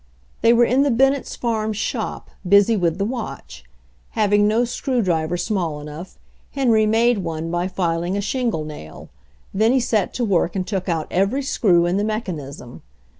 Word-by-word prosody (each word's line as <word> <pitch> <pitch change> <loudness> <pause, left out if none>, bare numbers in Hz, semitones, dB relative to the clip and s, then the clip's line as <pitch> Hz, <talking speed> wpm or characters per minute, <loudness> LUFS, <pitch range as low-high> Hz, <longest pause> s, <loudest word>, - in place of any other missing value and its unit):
They 230 - +5
were 240 0 +5
in 255 +3 +2
the 285 - +3
Bennetts' 270 +3 +1
farm 220 -2 -1
"shop," 215 +2 -4 0.2
busy 200 +3 +5
with 170 -4 0
the 200 - 0
watch. 70 - -6 0.5
Having 205 -1 +3
no 225 +3 +2
screw 245 0 -1
driver 165 -2 0
small 175 -7 -2
enough, 150 +5 -9 0.4
Henry 230 -6 +3
made 230 +1 +3
one 165 -2 -4
by 175 +1 -1
filing 175 0 -1
a - - 0
shingle 220 - -1
nail. 115 - -10 0.4
Then 220 +4 +3
he 265 - +3
set 225 -5 0
to 245 - 0
work 180 -3 +1
and 185 -1 -1
took 190 -2 -3
out 160 -2 -1
every 200 +10 +1
screw 185 -10 +2
in 175 +2 0
the 205 - 0
mechanism. 155 - -5
200 Hz, 175 wpm, -21 LUFS, 170-230 Hz, 0.5 s, They